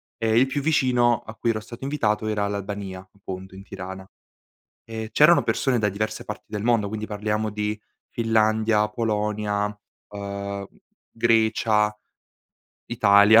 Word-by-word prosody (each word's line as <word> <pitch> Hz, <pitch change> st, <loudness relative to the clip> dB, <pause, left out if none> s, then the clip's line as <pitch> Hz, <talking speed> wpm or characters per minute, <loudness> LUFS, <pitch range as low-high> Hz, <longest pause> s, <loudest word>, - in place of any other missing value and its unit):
e 115 Hz, -1 st, +1 dB
il 130 Hz, -, +6 dB
più 135 Hz, +2 st, -2 dB
vicino 125 Hz, -6 st, +2 dB
a 110 Hz, -, -8 dB
cui 115 Hz, -, -1 dB
ero 110 Hz, -, -2 dB
stato 120 Hz, +3 st, -11 dB
invitato 110 Hz, -7 st, 0 dB
era 105 Hz, -1 st, 0 dB
l'Albania, 100 Hz, -1 st, -4 dB
appunto, 95 Hz, -1 st, -8 dB
in 95 Hz, -, -10 dB
Tirana. 95 Hz, -1 st, -8 dB, 0.8 s
E 110 Hz, -1 st, -6 dB
c'erano 150 Hz, +8 st, +6 dB
persone 130 Hz, -4 st, +1 dB
da 105 Hz, -1 st, +2 dB
diverse 110 Hz, +2 st, -3 dB
parti 105 Hz, -, -7 dB
del 105 Hz, -1 st, -4 dB
mondo, 115 Hz, -4 st, +2 dB
quindi 110 Hz, 0 st, -4 dB
parliamo 105 Hz, 0 st, -1 dB
di: 105 Hz, +1 st, -3 dB, 0.3 s
Finlandia, 110 Hz, -1 st, +2 dB
Polonia, 105 Hz, -2 st, -1 dB, 0.4 s
uhm, 100 Hz, -1 st, -5 dB, 0.4 s
Grecia, 110 Hz, -2 st, +2 dB, 0.9 s
Italia, 105 Hz, 0 st, +6 dB
105 Hz, 135 wpm, -24 LUFS, 100-115 Hz, 0.9 s, il